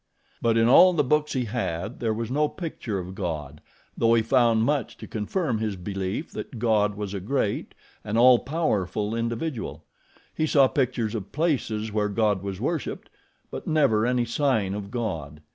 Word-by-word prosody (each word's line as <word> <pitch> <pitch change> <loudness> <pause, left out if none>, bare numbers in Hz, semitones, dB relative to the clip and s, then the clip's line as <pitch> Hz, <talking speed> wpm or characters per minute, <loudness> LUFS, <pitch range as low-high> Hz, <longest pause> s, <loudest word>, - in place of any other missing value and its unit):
But 115 -1 +2
in 115 0 +4
all 180 +9 +7
the 155 -4 +2
books 150 +3 +1
he 130 -3 0
had 105 -2 -3
there 115 -2 0
was 115 +2 -3
no 150 +2 +2
picture 150 - -5
of 90 0 -6
God, 75 -7 -5 0.3
though 115 0 +3
he 115 - +3
found 115 -2 +3
much 140 0 -1
to - - -9
confirm 115 - -2
his 110 -2 -2
belief 95 - -4
that 125 - -7
God 105 -3 +2
was 105 -1 -5
a 100 - -3
great, 105 +1 -2 0.3
an 105 +1 -2
all 125 0 +7
powerful 105 - -1
individual. 115 - -3 0.5
He 155 - 0
saw 140 -3 +5
pictures 125 -5 -1
of 105 -4 -5
places 125 -9 -1
where 105 0 0
God 105 -2 +1
was 100 -1 -5
worshiped; 155 +6 -3 0.4
but - - -7
never 135 -8 +3
any 125 -1 +1
sign 115 -6 +1
of 100 -1 -5
God. 80 - -4
115 Hz, 175 wpm, -25 LUFS, 105-130 Hz, 0.5 s, all